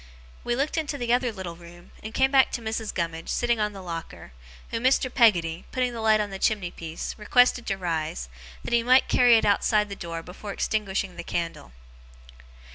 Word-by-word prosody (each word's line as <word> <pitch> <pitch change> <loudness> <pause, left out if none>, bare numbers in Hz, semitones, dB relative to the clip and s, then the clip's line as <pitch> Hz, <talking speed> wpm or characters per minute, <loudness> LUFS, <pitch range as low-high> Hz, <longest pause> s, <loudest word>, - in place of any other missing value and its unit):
We 240 - 0
looked 290 +5 0
into 295 -2 -3
the 240 -2 0
other 245 -1 +1
little 190 -5 -7
room, 175 0 -15
and 220 - -7
came 265 +3 +2
back 270 -1 +5
to 240 - -3
Mrs. 220 -1 -3
Gummidge, 165 -1 -4
sitting 240 -1 +1
on 210 0 0
the 195 -2 -10
locker, 165 - -7 0.4
whom 230 +1 -3
Mr. 255 0 +2
Peggotty, 175 -9 +3
putting 255 -2 -1
the 230 - -5
light 220 -1 +4
on 205 -1 -2
the 195 - -6
chimney 200 -5 0
piece, 165 -1 -6
requested 245 +2 +3
to 195 - -1
rise, 160 - -3 0.4
that - - -4
he 235 - +4
might 255 +3 +4
carry 245 -2 +6
it 220 - +1
outside 210 +1 +2
the 200 - -5
door 165 -3 -6
before 200 +3 -8
extinguishing 195 -4 -2
the - - -5
candle. 165 - -4
210 Hz, 200 wpm, -26 LUFS, 175-240 Hz, 0.4 s, carry